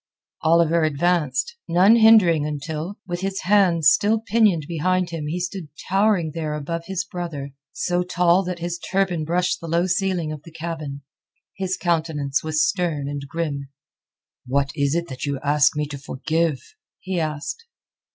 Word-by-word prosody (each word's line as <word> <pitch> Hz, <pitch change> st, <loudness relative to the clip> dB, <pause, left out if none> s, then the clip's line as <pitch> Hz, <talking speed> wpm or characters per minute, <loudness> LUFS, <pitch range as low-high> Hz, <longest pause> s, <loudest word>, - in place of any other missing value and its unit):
Oliver 170 Hz, +1 st, +3 dB
advanced, 165 Hz, -, 0 dB
none 190 Hz, +7 st, +5 dB
hindering 215 Hz, -9 st, +6 dB
until, 150 Hz, +5 st, -4 dB
with 175 Hz, -1 st, -4 dB
his 195 Hz, 0 st, -2 dB
hands 180 Hz, -6 st, +4 dB
still 220 Hz, +2 st, +3 dB
pinioned 215 Hz, -8 st, +2 dB
behind 175 Hz, +2 st, 0 dB
him 160 Hz, -3 st, -4 dB
he 170 Hz, +4 st, -2 dB
stood 180 Hz, -1 st, -4 dB, 0.2 s
towering 195 Hz, -4 st, +2 dB
there 155 Hz, -2 st, -3 dB
above 165 Hz, +3 st, -4 dB
his 190 Hz, -1 st, -2 dB
brother, 170 Hz, -6 st, -6 dB, 0.2 s
so 175 Hz, 0 st, -1 dB
tall 180 Hz, 0 st, +3 dB
that 180 Hz, 0 st, -3 dB
his 175 Hz, 0 st, -4 dB
turban 180 Hz, -4 st, -1 dB
brushed 175 Hz, +3 st, 0 dB
the 165 Hz, -, -6 dB
low 170 Hz, +2 st, +1 dB
ceiling 185 Hz, -4 st, 0 dB
of 150 Hz, -2 st, -7 dB
the 165 Hz, -, -13 dB
cabin. 155 Hz, -4 st, -6 dB, 0.5 s
His 190 Hz, -1 st, -2 dB
countenance 160 Hz, -5 st, 0 dB
was 155 Hz, 0 st, +2 dB
stern 165 Hz, -6 st, -1 dB
and 140 Hz, -1 st, -5 dB
grim. 145 Hz, -4 st, -3 dB, 0.8 s
"What 140 Hz, +2 st, +1 dB
is 140 Hz, 0 st, +1 dB
it 170 Hz, 0 st, -1 dB
that 130 Hz, +2 st, -5 dB
you 140 Hz, -2 st, -2 dB
ask 145 Hz, +1 st, +3 dB
me 150 Hz, -, 0 dB
to 140 Hz, -1 st, -6 dB
forgive?" 155 Hz, +2 st, -1 dB, 0.4 s
he 185 Hz, -2 st, -3 dB
asked. 155 Hz, -, -4 dB
170 Hz, 160 wpm, -22 LUFS, 150-180 Hz, 0.8 s, hindering